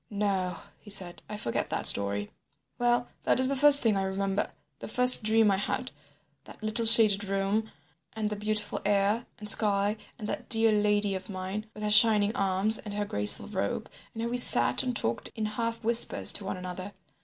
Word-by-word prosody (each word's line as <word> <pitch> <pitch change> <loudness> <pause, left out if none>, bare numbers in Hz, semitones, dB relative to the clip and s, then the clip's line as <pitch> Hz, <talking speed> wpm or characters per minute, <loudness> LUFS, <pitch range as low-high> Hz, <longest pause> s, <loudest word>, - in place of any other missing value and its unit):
"No," 195 -4 -4 0.2
he - - -17
said, 185 -4 -1
"I 210 - -7
forget 120 - -5
that - - -5
story." 100 0 +2 0.5
"Well, 240 0 -1
that - - -1
is 260 0 +3
the 275 - -2
first 285 +1 +8
thing 220 -3 0
I 195 - -2
remember, 195 +1 -4 0.3
the - - -10
first 250 0 +8
dream 220 -1 +1
I 195 - -1
had, 200 - -5 0.5
that - - -16
little 220 +1 -1
shaded 215 -3 +7
room 195 +3 -3 0.4
and 220 -1 -5
the - - -4
beautiful 210 +1 -4
air 205 +3 -1
and 210 -2 -11
sky 205 0 +2 0.2
and 210 - -9
that - - -7
dear 225 -2 +1
lady 210 -1 -1
of 190 +1 -8
mine, 195 +3 -7
with 210 - -10
her 210 - -2
shining 210 -1 +3
arms 195 +3 -2
and 205 -2 -10
her 205 0 -4
graceful 105 - -1
robe, - - -6 0.2
and 225 - -6
how 235 - -4
we 245 - -4
sat 245 - +3
and 250 -2 -5
talked 115 +1 -5
in 220 - -5
half 230 +2 -5
whispers 235 +1 +2
to 205 - -5
one 190 - -6
another. 185 +2 -9
210 Hz, 195 wpm, -26 LUFS, 195-225 Hz, 0.5 s, first